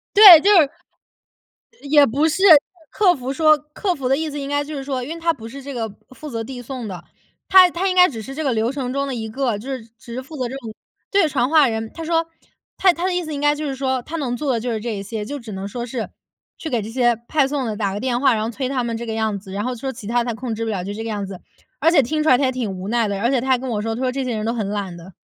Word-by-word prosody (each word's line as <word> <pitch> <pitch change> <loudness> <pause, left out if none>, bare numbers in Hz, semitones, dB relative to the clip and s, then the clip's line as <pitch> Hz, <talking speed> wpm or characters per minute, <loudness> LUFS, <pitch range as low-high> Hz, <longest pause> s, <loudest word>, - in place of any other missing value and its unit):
对， 400 -6 +11
就 405 - +4
是 320 -8 +6 1.2
也 290 -1 +7
不 280 +7 +1
是， 325 +5 -2 0.5
客 375 -4 +3
服 260 -2 -4
说 310 +1 +5
客 300 +6 -3
服 270 -5 -3
的 270 - +3
意 315 +1 -3
思 290 0 -5
应 275 - -5
该 290 0 0
就 300 +1 -7
是 275 - -4
说 265 -2 -3
因 270 +6 -5
为 335 - -10
他 335 0 +2
不 230 -8 -11
是 275 +4 -9
这 280 +1 -7
个 225 -2 -2 0.3
负 305 -1 -8
责 230 -2 -3
递 245 +2 -8
送 245 -2 -6
的， 180 -3 -8 0.4
他 375 -1 +8
他 350 +3 -2
应 370 - 0
该 360 0 +7
只 225 -7 -7
是 270 +5 -8
这 315 - -4
个 275 -4 0
流 225 +2 0
程 260 -3 -3
中 275 +1 -1
的 270 - -3
一 220 -2 -4
个， 235 -2 -1
就 250 +6 -8
是 260 -4 -5
只 235 +1 -10
是 255 - -4
负 305 +4 -11
责 255 -3 -2
这 265 - -6
种 230 -5 -8 0.4
对， 395 -6 +3
传 255 -4 0
话 310 -4 +5
人。 220 -1 -3
他 330 - -7
说， 330 0 +1 0.5
他 380 - +5
他 345 +1 -5
的 375 - +1
意 360 - 0
思 315 -2 -5
应 285 - -4
该 295 0 +3
就 300 +1 -4
是 275 - -3
说 260 -1 -1
他 320 +6 -6
能 265 -6 -2
做 285 0 -1
的 - - 0
就 245 +2 -3
是 220 -2 -2
这 225 -1 -3
一 195 - -5
些， 210 +2 -5
就 285 +7 -5
只 230 -4 -9
能 195 +1 -5
说 240 +3 -5
是 240 -2 -4 0.5
去 315 - -6
给 240 -4 0
这 210 - -6
些 240 0 +2
派 295 -3 +2
送 275 -2 -2
的 215 -2 -3
打 200 -2 -1
个 205 - -4
电 250 -1 0
话， 265 -1 +4
然 215 - -1
后 220 - -2
催 260 +3 -4
他 260 -2 -1
们 235 -1 -3
这 235 - -5
个 225 - -4
样 220 -2 -1
子， 190 -1 -12
然 200 +1 -3
后 250 0 -2
说 265 +3 -4
其 225 - -10
它 235 +2 +1
他 240 - -2
控 230 0 -4
制 225 +1 -3
不 225 - -2
了， 195 -4 -2
就 200 +3 -5
这 225 +2 -5
个 225 - -4
样 205 -2 -3
子， 190 -2 -9 0.4
而 320 +5 +4
且 335 -4 +5
听 305 +5 -1
出 310 - +2
来 250 - +6
他 280 - +1
也 260 - +1
挺 245 -5 -3
无 185 +1 -6
奈 235 0 +1
的， 200 -1 -3
而 235 +3 +1
且 270 - +2
他 255 +2 -3
还 260 -1 +4
跟 260 +1 -6
我 215 -4 -2
说， 225 +1 -2
他 235 - -6
说 260 -1 0
这 270 +1 -3
些 250 -2 -2
人 215 0 -3
都 230 - -1
很 220 -4 -2
懒 200 -4 -4
的。 175 +3 -12
255 Hz, 345 characters per minute, -21 LUFS, 225-290 Hz, 1.2 s, 对